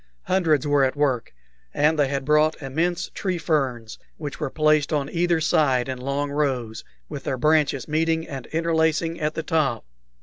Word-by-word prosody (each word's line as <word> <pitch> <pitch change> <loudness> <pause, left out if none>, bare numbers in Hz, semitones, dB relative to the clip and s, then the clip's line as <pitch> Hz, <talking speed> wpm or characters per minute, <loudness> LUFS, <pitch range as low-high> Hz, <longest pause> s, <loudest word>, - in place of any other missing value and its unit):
Hundreds 160 -7 +1
were 145 -1 +3
at 130 +1 +1
work, 135 -5 0 0.4
and 150 +1 +2
they 145 - +4
had 135 -1 -3
brought 150 +1 +3
immense 165 +5 -2
tree 185 -3 -2
ferns, 130 -9 -2 0.2
which 145 -3 -6
were 150 - -2
placed 155 0 +2
on 145 -3 0
either 170 -1 +1
side 145 -5 +2
in 130 -1 -4
long 140 +2 -2
rows, 130 -7 -2 0.2
with 135 - -7
their 130 - -1
branches 150 -2 +2
meeting 160 +1 0
and 135 -3 -7
interlacing 165 0 0
at 155 +1 -1
the 160 - -3
top. 150 -8 0
150 Hz, 170 wpm, -23 LUFS, 135-160 Hz, 0.4 s, they